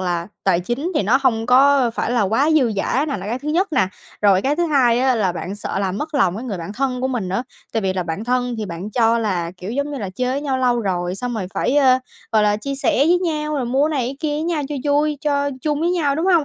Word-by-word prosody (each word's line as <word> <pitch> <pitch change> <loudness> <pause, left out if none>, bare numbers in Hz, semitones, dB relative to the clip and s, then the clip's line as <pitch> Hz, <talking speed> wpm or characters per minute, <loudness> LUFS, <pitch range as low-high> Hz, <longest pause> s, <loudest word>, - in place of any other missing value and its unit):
là 175 -2 -2 0.2
tài 180 -3 +3
chính 255 - -3
thì - - +2
nó 225 +7 +3
hông 225 -4 +1
có 265 0 +5
phải - - -1
là 240 -2 +2
quá 225 +10 +2
dư 270 -8 +3
dả 260 +8 0
nà, 285 - -2
là 195 0 -7
cái 235 +4 -2
thứ 290 - -6
nhất 345 +3 +1
nà. 190 -9 +2 0.3
Rồi 195 -2 +4
cái 285 +2 +1
thứ 345 +1 +1
hai 255 -6 +3
á 260 -1 +3
là 195 -5 +1
bạn 180 +2 -5
sợ 205 - -4
làm 195 0 -1
mất 310 +1 -5
lòng 195 -10 +2
cái 230 - -6
người 210 -7 -4
bạn 170 +4 -6
thân 255 +2 -2
của 260 - 0
mình 235 -8 -2
nữa, 195 +6 -1 0.3
tại 225 - 0
vì 190 -1 0
là 185 -1 -2
bạn 170 +5 -4
thân 245 0 0
thì 215 - -3
bạn 175 +3 -6
cho 230 0 +3
là, 185 -7 -1
kiểu, 185 +3 -7
giống 280 +4 -2
như 280 - -4
là, 200 -5 -4
chơi 250 +6 -2
với 275 - -1
nhau 275 -3 -1
lâu 245 -2 +2
rồi, 180 -3 -2
xong 245 +5 -4
rồi 205 -5 -3
phải, 275 - 0
ơ, 260 -3 +5 0.3
gọi 215 -1 +4
là, 210 0 +3
chia 275 +7 -4
sẻ 270 -2 0
với 355 +1 +4
nhau 305 -4 -2
rồi 265 - -1
mua 270 +5 +2
cái - - -3
này 245 - 0
cái 270 - -6
kia 310 -2 -1
với 300 - -2
nhau 330 -3 -1
cho - - -2 0.2
vui, 295 +1 +1
cho 285 -1 0
chung 295 -1 0
với 340 +2 +1
nhau, 310 -6 +1
đúng 325 +5 -1
hông? 345 -5 +4
250 Hz, 290 wpm, -20 LUFS, 205-285 Hz, 0.3 s, có